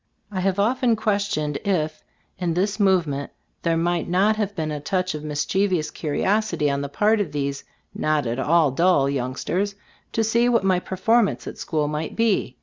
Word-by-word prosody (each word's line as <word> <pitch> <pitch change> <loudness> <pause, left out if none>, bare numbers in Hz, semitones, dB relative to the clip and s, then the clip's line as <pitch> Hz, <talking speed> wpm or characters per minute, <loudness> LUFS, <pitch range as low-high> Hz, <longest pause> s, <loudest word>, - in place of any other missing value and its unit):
I 190 - -3
have 190 +1 0
often 240 +3 +2
questioned 200 -9 -1
if 170 -7 -1 0.4
in 170 -3 -1
this 200 +4 0
movement 170 -8 +1 0.3
there 165 -1 +1
might 170 0 0
not 195 +5 +3
have 205 -2 -2
been 155 -3 -2
a 150 - -3
touch 185 +4 -1
of 150 -1 -6
mischievous 155 +3 0
curiosity 170 0 0
on 140 0 -1
the 140 - -4
part 210 +8 +2
of 175 -7 -3
these 140 -1 -3 0.3
not 155 -2 0
at 120 +2 -2
all 155 0 +3
dull 165 -1 +3
young 130 -2 -2
sters, 200 +7 -2 0.4
to 225 - +1
see 235 +2 +2
what 235 -4 +2
my 185 -2 +3
performance 205 +5 +1
at - - -8
school 155 -2 -1
might 150 +1 -3
be. 210 - +1
180 Hz, 180 wpm, -23 LUFS, 150-205 Hz, 0.4 s, not